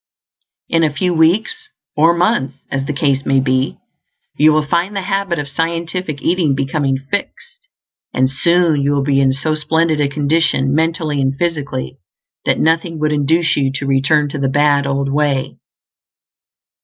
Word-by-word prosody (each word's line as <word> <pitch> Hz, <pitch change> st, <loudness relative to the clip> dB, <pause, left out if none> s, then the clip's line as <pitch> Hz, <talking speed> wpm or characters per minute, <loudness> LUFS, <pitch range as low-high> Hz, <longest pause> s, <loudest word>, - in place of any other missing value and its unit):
In 165 Hz, 0 st, +1 dB
a 155 Hz, -, +2 dB
few 175 Hz, +5 st, -1 dB
weeks, 220 Hz, -, +1 dB, 0.3 s
or 165 Hz, +3 st, +4 dB
months, 170 Hz, -, 0 dB, 0.2 s
as 135 Hz, 0 st, -2 dB
the -, -, -1 dB
case 140 Hz, -1 st, 0 dB
may 135 Hz, 0 st, +2 dB
be, 130 Hz, 0 st, 0 dB, 0.6 s
you 155 Hz, +1 st, +5 dB
will 155 Hz, 0 st, +1 dB
find 175 Hz, +6 st, -1 dB
the 195 Hz, -, -1 dB
habit 195 Hz, -2 st, -1 dB
of 145 Hz, -2 st, -4 dB
scientific 165 Hz, +1 st, -3 dB
eating 165 Hz, -5 st, +1 dB
becoming 135 Hz, 0 st, -1 dB
fixed; 135 Hz, +1 st, -6 dB, 0.4 s
and 130 Hz, +1 st, +2 dB
soon 165 Hz, +2 st, +2 dB
you 140 Hz, +1 st, +1 dB
will 140 Hz, -1 st, 0 dB
be 135 Hz, -1 st, +2 dB
in 135 Hz, -1 st, +3 dB
so 135 Hz, +4 st, -1 dB
splendid 155 Hz, 0 st, 0 dB
a 140 Hz, -, +1 dB
condition, 140 Hz, -2 st, +1 dB
mentally 160 Hz, -2 st, 0 dB
and 135 Hz, 0 st, 0 dB
physically, 145 Hz, -, -3 dB, 0.5 s
that -, -, +1 dB
nothing 165 Hz, +1 st, 0 dB
would 155 Hz, 0 st, 0 dB
induce 155 Hz, +3 st, +1 dB
you 135 Hz, -2 st, 0 dB
to 140 Hz, -, -2 dB
return 140 Hz, +2 st, +2 dB
to 145 Hz, -, -5 dB
the 135 Hz, -1 st, 0 dB
bad 145 Hz, 0 st, +2 dB
old 140 Hz, 0 st, -1 dB
way. 145 Hz, -3 st, -1 dB
150 Hz, 165 wpm, -17 LUFS, 135-165 Hz, 0.6 s, you